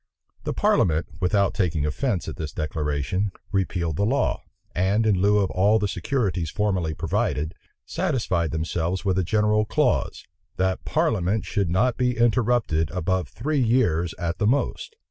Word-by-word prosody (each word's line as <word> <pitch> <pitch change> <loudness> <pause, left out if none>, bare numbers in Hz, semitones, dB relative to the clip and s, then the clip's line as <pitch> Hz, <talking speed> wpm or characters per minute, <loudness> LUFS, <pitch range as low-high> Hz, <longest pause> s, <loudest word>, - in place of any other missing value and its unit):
The - - -1
parliament, 80 -1 +2
without 100 +2 +2
taking 85 -7 0
offence 95 - -1
at - - -5
this 75 -2 -5
declaration, 75 +6 -2 0.2
repealed 85 -5 -1
the 100 - +1
law; 135 +5 0 0.3
and 100 +5 +1
in 100 -4 +2
lieu 105 +1 +4
of 100 -2 +1
all 100 +4 +3
the 105 -1 0
securities 90 - -1
formerly 95 -6 -1
provided, 75 +2 -1 0.3
satisfied 90 -10 -1
themselves 85 +3 -2
with 95 -1 +2
a - - +1
general 105 +3 +2
clause, 105 - 0 0.3
"that 95 0 0
parliament 110 - 0
should 100 -4 -1
not 115 +8 +1
be 125 -1 0
interrupted 115 - +2
above 90 -1 -1
three 135 - -1
years 110 -9 +1
at 85 0 -3
the 105 - +2
most." 140 - -1
95 Hz, 150 wpm, -24 LUFS, 85-110 Hz, 0.3 s, lieu